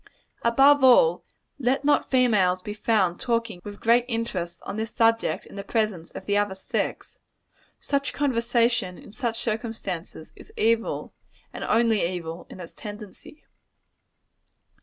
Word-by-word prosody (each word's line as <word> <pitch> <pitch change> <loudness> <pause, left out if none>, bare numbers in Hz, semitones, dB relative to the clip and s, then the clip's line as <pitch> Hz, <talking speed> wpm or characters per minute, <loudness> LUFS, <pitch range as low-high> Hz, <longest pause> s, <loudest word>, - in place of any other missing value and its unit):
Above 270 +4 +5
all, 475 - +6 0.4
let 265 +2 0
not 295 - +2
females 210 -8 +3
be 210 - -5
found 205 -5 +1
talking 230 -6 -1
with 205 -1 -9
great 235 +1 +4
interest 225 -8 -3
on 195 - -5
this 220 +1 -3
subject 230 -1 +1
in - - -13
the 200 - -4
presence 215 -8 -1
of 190 - -9
the 205 - 0
other 205 -1 +1
sex. 190 - -4 0.6
Such 280 0 -1
conversation, 235 -7 +1
in - - -13
such 230 0 -3
circumstances, 215 -8 -4
is - - -15
evil, 230 +1 0 0.4
and - - -6
only 225 -1 +3
evil, 170 -1 -4
in - - -11
its 170 - -9
tendency. 210 +7 -10
225 Hz, 140 wpm, -25 LUFS, 195-235 Hz, 0.6 s, all